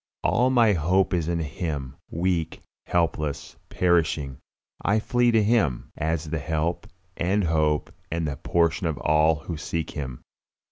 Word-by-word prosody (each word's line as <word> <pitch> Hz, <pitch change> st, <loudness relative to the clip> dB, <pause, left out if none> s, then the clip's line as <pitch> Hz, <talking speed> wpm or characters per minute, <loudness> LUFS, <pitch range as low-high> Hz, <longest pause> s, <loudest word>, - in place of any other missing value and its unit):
All 125 Hz, +2 st, +3 dB
my 120 Hz, -5 st, +5 dB
hope 90 Hz, +3 st, +2 dB
is 85 Hz, -3 st, 0 dB
in 85 Hz, 0 st, 0 dB
Him; 75 Hz, -3 st, -4 dB
weak, 85 Hz, -1 st, -1 dB, 0.2 s
helpless, 75 Hz, -4 st, -1 dB
perishing, 80 Hz, -6 st, +1 dB, 0.4 s
I 105 Hz, +2 st, +3 dB
flee 120 Hz, +2 st, +2 dB
to 110 Hz, -2 st, +4 dB
Him, 100 Hz, -, +1 dB
as 80 Hz, 0 st, -1 dB
the 80 Hz, -, -1 dB
help 80 Hz, +3 st, -2 dB, 0.3 s
and 95 Hz, +4 st, +1 dB
hope 80 Hz, -3 st, +1 dB, 0.2 s
and 85 Hz, -1 st, -1 dB
portion 85 Hz, +1 st, +1 dB
of 80 Hz, -3 st, -2 dB
all 75 Hz, +1 st, +3 dB
who 80 Hz, +2 st, -6 dB
seek 80 Hz, +1 st, -3 dB
Him. 65 Hz, -4 st, -6 dB
80 Hz, 140 wpm, -25 LUFS, 75-90 Hz, 0.4 s, my